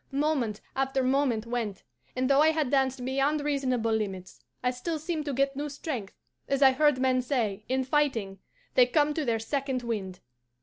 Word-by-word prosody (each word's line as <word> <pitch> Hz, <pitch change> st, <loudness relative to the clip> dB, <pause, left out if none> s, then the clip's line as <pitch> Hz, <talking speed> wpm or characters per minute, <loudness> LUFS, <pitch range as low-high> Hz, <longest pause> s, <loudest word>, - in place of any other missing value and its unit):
Moment 275 Hz, -7 st, 0 dB
after 270 Hz, 0 st, 0 dB
moment 255 Hz, -4 st, +1 dB
went, 230 Hz, -5 st, -3 dB, 0.3 s
and 255 Hz, 0 st, 0 dB
though 275 Hz, +1 st, +5 dB
I 310 Hz, -, +6 dB
had 310 Hz, -5 st, 0 dB
danced 265 Hz, -2 st, +1 dB
beyond 275 Hz, +3 st, +1 dB
reasonable 260 Hz, -6 st, 0 dB
limits, 195 Hz, -4 st, -3 dB, 0.2 s
I 250 Hz, -, +2 dB
still 315 Hz, +6 st, -3 dB
seemed 310 Hz, 0 st, -3 dB
to 290 Hz, -, -2 dB
get 275 Hz, +1 st, +1 dB
new 295 Hz, +2 st, -3 dB
strength, 270 Hz, -8 st, -5 dB, 0.3 s
as 275 Hz, 0 st, +2 dB
I 270 Hz, -, +9 dB
have 260 Hz, -, -2 dB
heard 295 Hz, -3 st, +4 dB
men 255 Hz, -1 st, +2 dB
say, 225 Hz, -6 st, -1 dB
in 260 Hz, 0 st, +1 dB
fighting, 250 Hz, -9 st, 0 dB, 0.3 s
they 250 Hz, -1 st, +6 dB
'come 295 Hz, +3 st, +2 dB
to 310 Hz, -, -1 dB
their 235 Hz, -4 st, +1 dB
second 265 Hz, +2 st, -2 dB
wind. 195 Hz, -6 st, -4 dB
265 Hz, 185 wpm, -28 LUFS, 235-285 Hz, 0.3 s, I